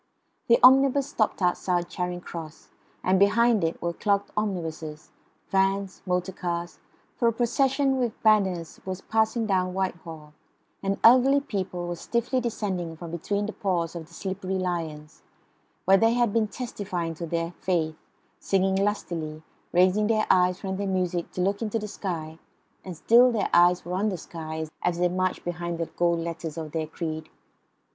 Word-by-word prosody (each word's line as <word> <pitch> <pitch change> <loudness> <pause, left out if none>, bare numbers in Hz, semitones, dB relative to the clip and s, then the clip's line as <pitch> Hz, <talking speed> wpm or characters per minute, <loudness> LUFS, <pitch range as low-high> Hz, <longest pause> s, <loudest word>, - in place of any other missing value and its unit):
The 235 - +6
omnibus 270 +1 +6
stopped 215 -8 -1
outside 175 0 +1
Charing 180 0 -4
Cross; 165 -3 -9 0.3
and 185 +1 +3
behind 225 +1 +4
it 165 0 -1
were 170 0 -2
clogged 200 +2 0
omnibuses, 165 -7 -4 0.4
vans, 195 0 +1
motor 180 +1 0
cars, 175 -1 -4 0.4
for 235 - +1
a - - +4
procession 265 +3 +1
with 240 -3 -2
banners 190 -6 +2
was 190 0 -5
passing 220 +1 +1
down 185 -3 0
Whitehall, 165 -5 -4 0.5
and 195 0 -1
elderly 260 +4 +7
people 185 -8 -4
were 175 - -3
stiffly 240 +7 -1
descending 190 -8 -3
from 170 0 -8
between 200 +5 -2
the 215 - -5
paws 175 -4 -1
of 165 -2 -7
the 170 - -20
slippery 190 0 -3
lions, 165 -5 -4 0.6
where 195 +1 +6
they 225 +2 +3
had 240 -3 +2
been 225 -2 +2
testifying 200 -8 -4
to 165 +1 -6
their 165 +1 -2
faith, 160 -4 0 0.4
singing 190 0 +1
lustily, 170 -6 -2 0.3
raising 185 +4 +3
their 215 -1 +2
eyes 180 0 +3
from 190 -1 -4
their 200 0 -2
music 180 -2 -1
to 180 - -2
look 200 +3 0
into 225 0 -1
the 210 -1 -4
sky, 165 -6 -5 0.4
and 180 -3 -7
still 240 +8 +6
their 220 -4 -1
eyes 175 +1 +5
were 175 - -4
on 200 +4 +1
the 190 - -3
sky 160 -1 -6 0.2
as 175 -1 0
they 175 0 +2
marched 185 +1 -1
behind 175 -1 -3
the 165 - -1
gold 170 +1 0
letters 165 -1 -5
of 155 -2 -5
their 160 -1 -2
creed. 160 0 -5
185 Hz, 165 wpm, -26 LUFS, 170-210 Hz, 0.6 s, elderly